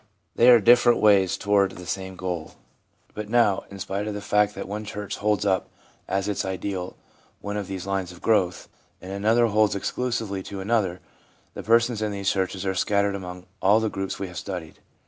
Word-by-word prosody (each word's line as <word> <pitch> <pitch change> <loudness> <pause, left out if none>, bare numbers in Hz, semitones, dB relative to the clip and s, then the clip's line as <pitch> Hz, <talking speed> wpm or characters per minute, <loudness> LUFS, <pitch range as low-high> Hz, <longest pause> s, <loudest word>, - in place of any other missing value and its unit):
They 120 - +6
are 120 -2 +9
different 120 +2 +5
ways 100 -3 +4
toward 100 -1 +2
the 90 - -10
same 95 +1 -4
goal. 90 -4 -4 0.6
But 105 -1 -6
now, 115 -4 +3
in 100 - -9
spite 100 +2 -3
of 105 - -3
the - - -3
fact 105 0 +1
that - - -6
one 105 +2 -4
church 105 -1 -5
holds 105 0 0
up 95 -2 +1 0.4
as 95 +1 -1
its 105 - -1
ideal 95 -1 -4 0.4
one 105 0 -5
of 105 -2 -3
these 95 -2 -5
lines 95 -2 -2
of 90 - -13
growth, 95 -5 +1 0.3
and 95 - -9
another 110 +4 +3
holds 110 -2 +2
exclusively 110 -2 -2
to 95 +1 -7
another, 95 -3 0 0.5
the - - -6
persons 115 0 +2
in 105 -1 -1
these 100 -1 0
churches 95 0 -2
are 95 - 0
scattered 100 +1 +1
among 90 -2 -7 0.2
all 100 +4 +5
the 110 -1 0
groups 95 0 -4
we 100 - -4
have 90 -1 -7
studied. 90 -5 -7
100 Hz, 195 wpm, -25 LUFS, 95-105 Hz, 0.6 s, are